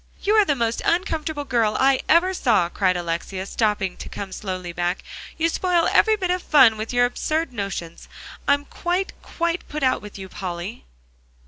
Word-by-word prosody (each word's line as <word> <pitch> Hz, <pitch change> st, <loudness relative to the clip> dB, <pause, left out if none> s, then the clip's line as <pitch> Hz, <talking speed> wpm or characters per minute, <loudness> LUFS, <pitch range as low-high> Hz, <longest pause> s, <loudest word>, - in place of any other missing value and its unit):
"You 415 Hz, -, +2 dB
are 430 Hz, -2 st, +5 dB
the 290 Hz, -, +1 dB
most 230 Hz, -2 st, -1 dB
uncomfortable 320 Hz, -4 st, -1 dB
girl 230 Hz, -5 st, +1 dB
I 270 Hz, 0 st, +4 dB
ever 355 Hz, +4 st, +4 dB
saw," 220 Hz, -, +2 dB
cried 185 Hz, -1 st, +1 dB
Alexia, 175 Hz, +2 st, -3 dB
stopping, 210 Hz, -3 st, -1 dB
to -, -, -8 dB
come 195 Hz, -1 st, -6 dB
slowly 185 Hz, -3 st, -5 dB
back. 175 Hz, +2 st, -2 dB, 0.3 s
"You 330 Hz, -, +2 dB
spoil 345 Hz, 0 st, +1 dB
every 440 Hz, 0 st, +5 dB
bit 370 Hz, -4 st, -1 dB
of 365 Hz, 0 st, 0 dB
fun 265 Hz, -9 st, +6 dB
with 215 Hz, +1 st, -5 dB
your 245 Hz, 0 st, +4 dB
absurd 310 Hz, +4 st, -2 dB
notions. 195 Hz, -6 st, -5 dB, 0.4 s
I'm 285 Hz, 0 st, +3 dB
quite, 360 Hz, +6 st, -2 dB
quite 340 Hz, +1 st, -3 dB
put 300 Hz, -1 st, -4 dB
out 260 Hz, -, +2 dB
with 210 Hz, -1 st, -10 dB
you, 190 Hz, -1 st, -7 dB
Polly." 185 Hz, +3 st, -6 dB
245 Hz, 180 wpm, -23 LUFS, -, 0.4 s, fun